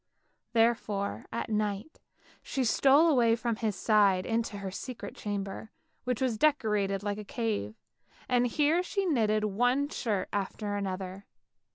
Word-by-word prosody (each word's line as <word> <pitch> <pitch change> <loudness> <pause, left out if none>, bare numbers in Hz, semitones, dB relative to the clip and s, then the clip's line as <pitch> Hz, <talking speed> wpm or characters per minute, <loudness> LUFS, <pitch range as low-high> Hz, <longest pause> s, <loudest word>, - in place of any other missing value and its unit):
Therefore 225 -3 +1
at 230 0 -3
night 210 +5 -2 0.4
she 265 - -2
stole 275 +6 +5
away 240 -7 +4
from 235 -1 -2
his 215 -3 -1
side 200 -4 +3
into 225 -2 -1
her 195 -1 -5
secret 245 +5 -7
chamber, 200 0 -4 0.4
which 250 -2 -1
was 245 -5 0
decorated 210 -9 +1
like 205 0 -2
a - - -6
cave, 210 - -3 0.5
and 245 -1 +3
here 300 +7 +2
she 390 +2 -2
knitted 215 - +2
one 245 +7 +1
shirt 210 -10 -2
after 205 +1 -2
another. 190 -1 -4
220 Hz, 140 wpm, -29 LUFS, 200-245 Hz, 0.5 s, stole